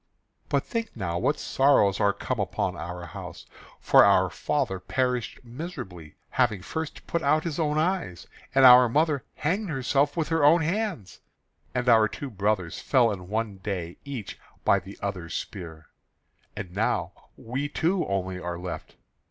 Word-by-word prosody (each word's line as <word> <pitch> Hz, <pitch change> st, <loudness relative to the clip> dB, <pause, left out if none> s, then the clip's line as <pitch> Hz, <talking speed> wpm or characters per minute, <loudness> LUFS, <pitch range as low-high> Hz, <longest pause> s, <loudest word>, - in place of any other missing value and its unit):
"But -, -, +1 dB
think 230 Hz, -1 st, -4 dB
now 85 Hz, -4 st, -2 dB
what 150 Hz, +10 st, +1 dB
sorrows 135 Hz, -8 st, +3 dB
are 100 Hz, -1 st, +4 dB
come -, -, -4 dB
upon -, -, -1 dB
our 85 Hz, +2 st, -6 dB
house. 85 Hz, -, -9 dB, 0.3 s
For -, -, +6 dB
our -, -, +4 dB
father 135 Hz, -11 st, -1 dB
perished 125 Hz, +6 st, -1 dB
miserably, 115 Hz, -, -8 dB, 0.3 s
having 110 Hz, -7 st, +1 dB
first 160 Hz, -, -5 dB
put 170 Hz, -, -1 dB
out 150 Hz, +2 st, +2 dB
his 165 Hz, -2 st, -3 dB
own 150 Hz, -2 st, +1 dB
eyes; 160 Hz, -, -1 dB, 0.3 s
and 135 Hz, -1 st, +7 dB
our 125 Hz, -1 st, +9 dB
mother 150 Hz, +1 st, +1 dB
hanged 190 Hz, +6 st, -1 dB
herself 140 Hz, +1 st, +1 dB
with 160 Hz, -2 st, 0 dB
her 165 Hz, -2 st, +1 dB
own 160 Hz, +4 st, +6 dB
hands; 180 Hz, -, -2 dB, 0.6 s
and 125 Hz, 0 st, -1 dB
our 110 Hz, -3 st, +6 dB
two 135 Hz, +6 st, -7 dB
brothers 100 Hz, -4 st, -1 dB
fell 125 Hz, -5 st, +3 dB
in 90 Hz, -3 st, -6 dB
one 110 Hz, -2 st, -2 dB
day, 95 Hz, -3 st, -4 dB
each 135 Hz, -8 st, -7 dB, 0.3 s
by -, -, +5 dB
the 100 Hz, -, -12 dB
other's 90 Hz, -5 st, -4 dB
spear; 80 Hz, -5 st, -7 dB, 0.7 s
and 95 Hz, -3 st, -6 dB
now 105 Hz, +4 st, 0 dB, 0.3 s
we 135 Hz, +5 st, -4 dB
two 175 Hz, +4 st, +1 dB
only 95 Hz, -1 st, -2 dB
are 85 Hz, -1 st, -4 dB
left. 90 Hz, -1 st, -7 dB
120 Hz, 160 wpm, -26 LUFS, 95-150 Hz, 0.7 s, our